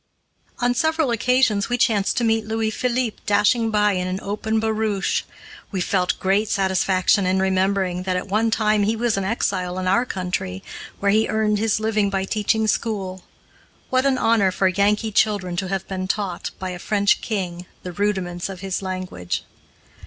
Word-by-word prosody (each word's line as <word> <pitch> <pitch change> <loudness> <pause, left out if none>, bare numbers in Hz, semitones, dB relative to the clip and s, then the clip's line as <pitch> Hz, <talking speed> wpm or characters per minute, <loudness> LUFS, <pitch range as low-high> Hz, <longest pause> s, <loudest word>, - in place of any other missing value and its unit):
On 245 0 +1
several 315 0 +1
occasions 235 -3 +2
we 245 - +1
chanced 210 -4 +2
to 240 - +1
meet 225 -1 +1
Louis 220 0 -1
Philippe 245 -1 -1
dashing 210 +3 +3
by 210 -1 +3
in 185 -2 -1
an 185 0 -2
open 220 +2 -1
barouche. 220 -2 0 0.5
We 195 - -3
felt 180 0 0
great 200 +3 +1
satisfaction 190 0 +2
in 190 +1 +2
remembering 190 -1 +1
that 185 0 -1
at 180 - -4
one 215 +3 +1
time 215 -1 +2
he 215 +3 +1
was 230 0 0
an 195 - -1
exile 185 -3 -1
in 185 - -2
our 235 +7 +2
country, 180 - -3 0.4
where 200 0 +2
he 220 +2 +3
earned 215 -1 +1
his 220 -1 +1
living 215 -2 +1
by 195 -1 -1
teaching 220 +2 0
school. 195 -4 -2 0.7
What 260 +1 +3
an 265 -1 +2
honor 220 -6 +3
for 190 +1 +1
Yankee 205 +3 +1
children 200 -4 +1
to 190 - -1
have 195 0 -3
been 185 -1 -4
taught, 190 -3 -2
by 185 -1 -4
a 180 - -6
French 200 +1 +2
king, 180 -5 -4 0.2
the 180 - -5
rudiments 185 -2 -2
of 185 -2 -8
his 195 -1 -3
language. 185 - -4
200 Hz, 175 wpm, -22 LUFS, 185-220 Hz, 0.7 s, dashing